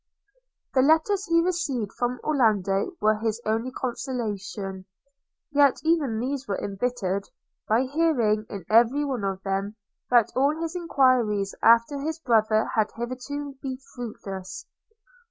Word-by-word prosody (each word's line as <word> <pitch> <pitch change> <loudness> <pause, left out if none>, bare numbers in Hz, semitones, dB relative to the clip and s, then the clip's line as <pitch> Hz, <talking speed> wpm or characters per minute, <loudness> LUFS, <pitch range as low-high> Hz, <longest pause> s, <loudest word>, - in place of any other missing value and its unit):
The 260 - +4
letters 320 +8 +3
he 335 0 +3
received 280 - -1
from 245 0 -2
Orlando 215 - +1
were 215 0 +3
his 225 0 -1
only 225 +3 0
consolation; 210 -7 -4 0.7
yet 285 -2 +4
even 310 -8 +1
these 270 +2 -3
were 200 - -1
embittered, 200 -2 -2 0.4
by 225 +4 +3
hearing, 255 -8 +1
in 195 -4 -7
every 240 +6 +4
one 260 -7 -3
of 195 -1 -3
them, 195 +2 -2 0.3
that 240 -3 +4
all 285 +4 +2
his 330 +1 -4
enquiries 255 - +2
after 235 +5 +4
his 315 +2 -3
brother 220 -6 +2
had 215 -1 +2
hitherto 265 +4 -5
been 260 -2 -4 0.2
fruitless. 195 -6 -7
240 Hz, 130 wpm, -25 LUFS, 210-280 Hz, 0.7 s, The